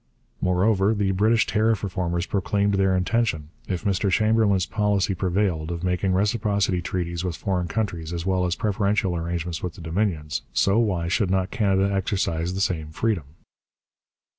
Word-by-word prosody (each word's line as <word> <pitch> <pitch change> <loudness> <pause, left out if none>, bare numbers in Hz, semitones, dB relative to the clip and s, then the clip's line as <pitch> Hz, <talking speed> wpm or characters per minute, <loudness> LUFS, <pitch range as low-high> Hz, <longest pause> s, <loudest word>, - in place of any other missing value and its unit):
Moreover, 95 +3 +2
the 100 -2 +1
British 110 +4 +3
tariff 110 -1 +1
reformers 90 -3 -2
proclaimed 100 +1 0
their 95 -1 +2
intention, 90 -6 0 0.2
if 90 -1 -3
Mr 100 -1 +1
Chamberlain's 110 -2 +3
policy 105 -1 +1
prevailed, 90 -3 0
of 85 0 -4
making 90 +1 0
reciprocity 100 -2 +1
treaties 85 -1 -3
with 90 -3 -2
foreign 90 0 -2
countries 85 -7 -3
as 85 0 -4
well 95 -1 +1
as 90 0 0
preferential 100 -3 0
arrangements 85 0 -3
with 90 -2 -4
the 95 - -11
Dominions, 80 -3 -1
so 100 +3 +3
why 95 -7 0
should 95 +2 +1
not 95 0 0
Canada 100 -4 +1
exercise 90 -3 -1
the 95 - -2
same 85 -7 -1
freedom? 95 -1 -1
95 Hz, 155 wpm, -24 LUFS, 85-105 Hz, 0.2 s, British